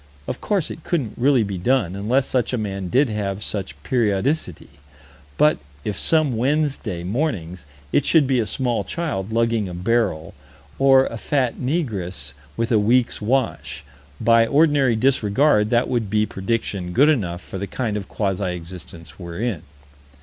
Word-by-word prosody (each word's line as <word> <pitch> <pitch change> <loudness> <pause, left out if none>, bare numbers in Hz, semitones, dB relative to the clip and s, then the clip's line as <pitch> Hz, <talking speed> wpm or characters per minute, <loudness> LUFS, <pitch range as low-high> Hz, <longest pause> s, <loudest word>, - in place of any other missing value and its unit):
Of - - -4
course 200 -6 -1
it 160 - -9
couldn't 135 - -1
really 130 -1 +3
be 100 -3 -4
done, 100 -3 +1
unless 120 +7 +1
such 125 -2 -1
a - - +1
man 100 -3 -3
did 135 +9 +3
have 105 -1 -3
such 100 -3 -4
periodicity, 115 - -1 0.7
but 150 0 +4 0.3
if 105 - -2
some 155 -6 +2
Wednesday 130 - -1
mornings 90 - -3 0.2
it - - +3
should 160 -4 +4
be 130 -1 +1
a 110 - 0
small 120 0 -1
child 110 - -3
lugging 115 -3 +1
a 90 - -7
barrel, 90 -5 0 0.5
or 135 -1 +6
a 115 - -5
fat 130 -3 0
negress 100 - -3 0.2
with 115 +1 -1
a 110 - +4
week's 120 +4 +2
wash, 105 - -1 0.4
by 115 0 +4
ordinary 145 -3 +3
disregard 110 -1 +2
that 120 +1 +2
would 120 -5 -1
be 105 +1 +2
prediction 95 -3 -3
good 140 +8 +5
enough 95 - +1
for 95 - -7
the 100 - -4
kind 115 -3 -3
of 100 -3 -4
quasi 95 -3 -1
existence 85 -2 -11
we're 85 -1 -7
in. 115 -8 -2
115 Hz, 160 wpm, -22 LUFS, 95-130 Hz, 0.7 s, or